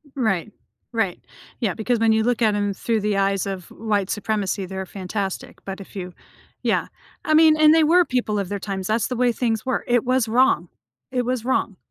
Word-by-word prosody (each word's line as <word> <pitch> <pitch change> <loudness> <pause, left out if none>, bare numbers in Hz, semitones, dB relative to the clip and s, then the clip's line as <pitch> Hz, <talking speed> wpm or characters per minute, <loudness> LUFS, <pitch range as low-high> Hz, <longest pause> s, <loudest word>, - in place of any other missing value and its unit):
Right. 220 -6 0 0.4
Right. 220 -6 0 0.4
Yeah, 210 -6 0
because 230 +3 -1
when 225 -1 +4
you 220 0 +2
look 245 +1 0
at 215 -2 +3
'em 205 -1 0
through 220 +2 -1
the 210 -1 0
eyes 195 -1 +1
of 190 -3 -5
white 205 -3 -1
supremacy, 205 -2 -1
they're 190 +1 -5
fantastic, 190 +1 -5
but 195 0 -6
if 195 - -13
you 180 -2 -6 0.5
yeah, - - +1 0.4
I 310 - +2
mean, 315 0 +7
and 310 0 +6
they 325 - +5
were 345 +3 +5
people 240 -6 -1
of 195 -2 -3
their 205 - -2
times, 190 -2 -4
that's 220 +1 +1
the 250 - -3
way 245 0 +3
things 225 -2 -1
were. 260 - 0
It 240 -1 +3
was 255 -2 +1
wrong. 230 -7 +3 0.4
It 250 -1 0
was 245 -1 -2
wrong. 235 -6 0
220 Hz, 205 wpm, -22 LUFS, 195-245 Hz, 0.5 s, mean